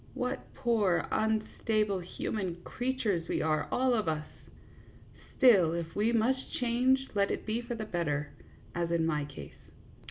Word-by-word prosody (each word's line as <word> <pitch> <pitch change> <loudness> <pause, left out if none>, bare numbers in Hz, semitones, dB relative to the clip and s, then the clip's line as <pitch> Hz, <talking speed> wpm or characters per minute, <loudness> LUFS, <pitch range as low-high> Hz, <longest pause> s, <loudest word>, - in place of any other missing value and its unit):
What 250 +2 -3
poor, 225 -9 +2
unstable, 215 -2 0
human 180 0 -4
creatures 235 -9 -1
we - - 0
are, 155 -1 +1
all 255 0 +2
of 215 -6 0
us! 155 -1 -1 1.1
Still, 195 -11 +6
if 165 -1 -4
we 215 +3 +2
must 245 +3 +1
change, 255 +2 +2
let 200 -1 +2
it - - -3
be 225 +2 -1
for 240 0 -5
the 220 -1 -4
better, 150 -7 -2 0.4
as 170 -1 -1
in 170 -1 +1
my 150 -3 0
case. 145 - -12
210 Hz, 150 wpm, -31 LUFS, 170-240 Hz, 1.1 s, Still